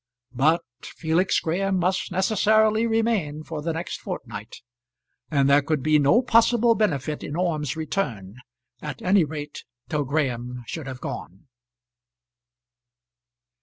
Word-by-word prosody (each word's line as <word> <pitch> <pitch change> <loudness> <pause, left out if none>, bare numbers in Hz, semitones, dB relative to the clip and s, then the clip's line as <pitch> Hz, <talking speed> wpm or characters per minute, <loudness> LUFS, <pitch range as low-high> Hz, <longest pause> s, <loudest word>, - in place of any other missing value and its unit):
But 155 +7 +2 0.2
Felix 165 +3 0
Graham 190 +4 0
must 185 +2 0
necessarily 215 +3 +3
remain 220 -10 0
for 155 -1 -6
the 165 +2 -2
next 165 +2 -4
fortnight, - - -7 0.7
and 140 -3 +2
there 140 +1 +5
could 145 -1 -1
be 155 0 +4
no 180 - +4
possible 235 0 +4
benefit 150 - -1
in 145 - -5
Orme's 160 -5 -1
return, 125 - -3 0.4
at 150 -3 -7
any 190 0 +4
rate 150 -1 -7 0.3
till 150 -2 0
Graham 125 -4 -2
should 155 +3 -6
have 130 -1 -7
gone. 95 +3 -7
160 Hz, 125 wpm, -24 LUFS, 145-195 Hz, 0.7 s, there